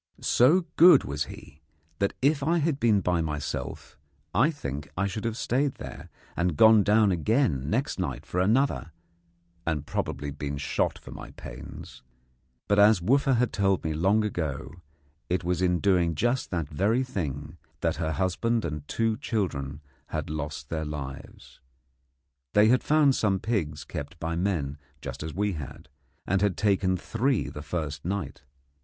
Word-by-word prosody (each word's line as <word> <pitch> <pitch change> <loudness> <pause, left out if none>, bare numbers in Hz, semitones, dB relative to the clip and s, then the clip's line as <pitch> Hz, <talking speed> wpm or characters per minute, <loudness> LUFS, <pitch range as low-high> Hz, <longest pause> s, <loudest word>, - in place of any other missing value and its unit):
So 165 +9 +4
good 175 +2 +8
was 75 +1 -2
he 75 +3 -12 0.4
that, 100 - 0
if 145 +1 +3
I 165 +5 +2
had 155 -3 0
been 110 -4 +3
by 90 -1 +1
myself, 75 -2 -5 0.3
I 130 +7 +4
think 70 - -5
I 100 - +1
should 100 +3 -4
have 115 -1 -2
stayed 135 +4 0
there, - - -9 0.3
and 85 -3 0
gone 110 +2 +7
down 105 0 +4
again 90 - +1
next - - -1
night - - -3
for 90 - -2
another, 110 - +1 0.7
and 75 -3 -2
probably 70 0 -3
been 70 0 -4
shot 70 - -1
for - - -12
my - - -8
pains. - - -10 0.7
But, 100 0 +3
as 105 -1 +6
Wooffa 135 +8 +3
had 125 +1 +1
told 95 -2 +1
me 80 - -1
long 95 +7 +2
ago, 80 -8 -3 0.6
it 90 0 0
was 90 0 0
in 90 -1 +3
doing 90 -4 +2
just 120 - 0
that 85 -5 -2
very 100 - +1
thing 75 - -4 0.2
that - - 0
her 80 -1 -1
husband 110 +6 0
and 75 -2 -5
two 115 -1 0
children 80 - -2 0.3
had - - -4
lost 75 -2 -5
their 80 -1 -2
lives. 70 -3 -8 1.0
They 105 +1 +6
had 125 +1 +4
found 150 -2 +4
some 100 -6 +1
pigs 80 -10 -2
kept 75 +3 -7
by 85 0 -2
men 85 -6 -1 0.2
just - - -7
as 80 +1 -4
we 100 +1 0
had, 75 +1 -8 0.4
and 95 +1 +1
had 100 -3 +1
taken 95 -3 +2
three 120 +6 0
the 75 - -8
first 75 -2 -4
night. 90 -7 -3
90 Hz, 160 wpm, -27 LUFS, 75-110 Hz, 1.0 s, good